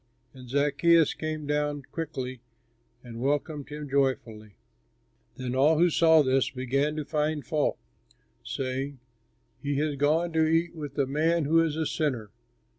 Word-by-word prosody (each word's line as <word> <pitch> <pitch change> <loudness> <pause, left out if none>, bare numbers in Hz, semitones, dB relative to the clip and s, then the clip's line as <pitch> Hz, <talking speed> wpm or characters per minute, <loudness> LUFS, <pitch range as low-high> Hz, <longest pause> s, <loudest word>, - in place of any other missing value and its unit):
And 130 -2 -12
Zaccheus 150 +4 +3
came 155 -1 -4
down 145 0 -1
quickly 130 -6 -5 0.6
and 120 -1 -8
welcomed 145 +1 -1
him 150 0 -6
joyfully. 125 -6 -1 0.8
Then 130 -2 -4
all 145 +5 +4
who 175 +1 +4
saw 160 -1 +5
this 130 0 +2
began 140 +4 -1
to 155 -1 -3
find 150 0 -1
fault, 155 -3 0 0.7
saying, 135 +1 -4 0.6
"He 145 0 -2
has 145 0 -1
gone 160 +4 +1
to 160 -1 +3
eat 165 +2 +1
with 145 -3 -8
a 140 - +2
man 155 +4 +1
who 165 +3 +4
is 155 -2 -1
a 160 0 -1
sinner." 130 -10 -2
145 Hz, 145 wpm, -27 LUFS, 135-155 Hz, 0.8 s, saw